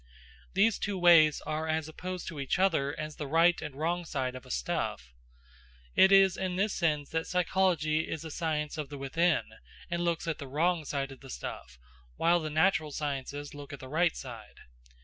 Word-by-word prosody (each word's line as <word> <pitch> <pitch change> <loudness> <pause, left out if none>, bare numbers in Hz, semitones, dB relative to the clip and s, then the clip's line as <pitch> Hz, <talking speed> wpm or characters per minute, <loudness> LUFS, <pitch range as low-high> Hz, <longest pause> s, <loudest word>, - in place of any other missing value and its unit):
These 215 +3 +3
two 205 -2 -2
ways 170 -4 +6
are 155 +1 -3
as 160 -1 -1
opposed 180 +3 -6
to 155 - -6
each 135 - -1
other 160 -6 +1
as 155 -1 -5
the 150 - -4
right 165 +4 +4
and 150 -3 -6
wrong 170 +4 -1
side 135 -6 -2
of 130 - -10
a - - -14
stuff. - - -3 0.8
It 190 - +6
is 195 -2 +6
in 185 -1 -2
this 195 +2 +1
sense 150 -5 0
that 160 0 -2
psychology 175 -4 +1
is 160 - -4
the 160 - -7
science 155 -1 -2
of 145 -3 -4
the 145 - -7
within 160 +5 +1 0.5
and 170 0 -1
looks 170 -1 -1
at 165 - -2
the 140 - -7
wrong 160 +4 +1
side 140 -1 -3
of 135 - -11
the 135 - -13
stuff, 60 - -7 0.4
while 175 +1 +3
the 155 -2 -4
natural 155 0 +2
sciences 145 0 -4
look 145 -1 -9
at 140 - -7
the 130 - -9
right 165 +3 +2
side. 115 -5 -10
155 Hz, 195 wpm, -30 LUFS, 145-175 Hz, 0.8 s, ways